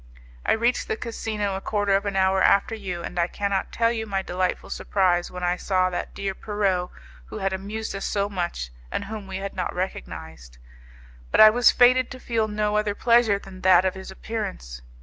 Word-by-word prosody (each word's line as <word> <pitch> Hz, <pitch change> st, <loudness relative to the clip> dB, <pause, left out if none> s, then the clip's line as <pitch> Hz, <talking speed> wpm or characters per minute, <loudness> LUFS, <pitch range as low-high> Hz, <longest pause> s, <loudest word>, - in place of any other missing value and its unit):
I -, -, +2 dB
reached 235 Hz, +2 st, +1 dB
the 220 Hz, -, -2 dB
casino 215 Hz, -4 st, -3 dB
a 190 Hz, -, -4 dB
quarter 205 Hz, -2 st, +1 dB
of 200 Hz, +1 st, 0 dB
an 200 Hz, -, -2 dB
hour 190 Hz, 0 st, +3 dB
after 200 Hz, +4 st, +4 dB
you, 185 Hz, -6 st, -5 dB
and -, -, -4 dB
I 170 Hz, -, +2 dB
cannot 200 Hz, +1 st, -2 dB
tell 230 Hz, 0 st, +2 dB
you 220 Hz, -1 st, -3 dB
my 195 Hz, -2 st, -1 dB
delightful 185 Hz, 0 st, -2 dB
surprise 180 Hz, -3 st, +1 dB
when 180 Hz, 0 st, -7 dB
I 175 Hz, 0 st, +1 dB
saw 185 Hz, -1 st, +1 dB
that 175 Hz, -, -4 dB
dear 195 Hz, -1 st, -3 dB
Pierrot 190 Hz, -3 st, -1 dB, 0.4 s
who -, -, -7 dB
had 195 Hz, 0 st, -1 dB
amused 205 Hz, +4 st, -4 dB
us 195 Hz, -, -5 dB
so 200 Hz, -1 st, 0 dB
much, 175 Hz, -, -4 dB, 0.2 s
and -, -, -2 dB
whom 215 Hz, -1 st, -7 dB
we 190 Hz, 0 st, -5 dB
had 195 Hz, 0 st, -5 dB
not 180 Hz, -, -3 dB
recognized. 60 Hz, -, -6 dB, 0.7 s
But -, -, +1 dB
I 215 Hz, 0 st, +10 dB
was 245 Hz, +2 st, +5 dB
fated 255 Hz, +1 st, +5 dB
to 255 Hz, -, -9 dB
feel 225 Hz, -3 st, -1 dB
no 210 Hz, 0 st, 0 dB
other 210 Hz, -1 st, 0 dB
pleasure 235 Hz, -4 st, +4 dB
than 195 Hz, -2 st, -12 dB
that 185 Hz, 0 st, +5 dB
of 185 Hz, -, +1 dB
his 190 Hz, -1 st, -9 dB
appearance. 190 Hz, -, -6 dB
195 Hz, 205 wpm, -24 LUFS, 185-215 Hz, 0.7 s, I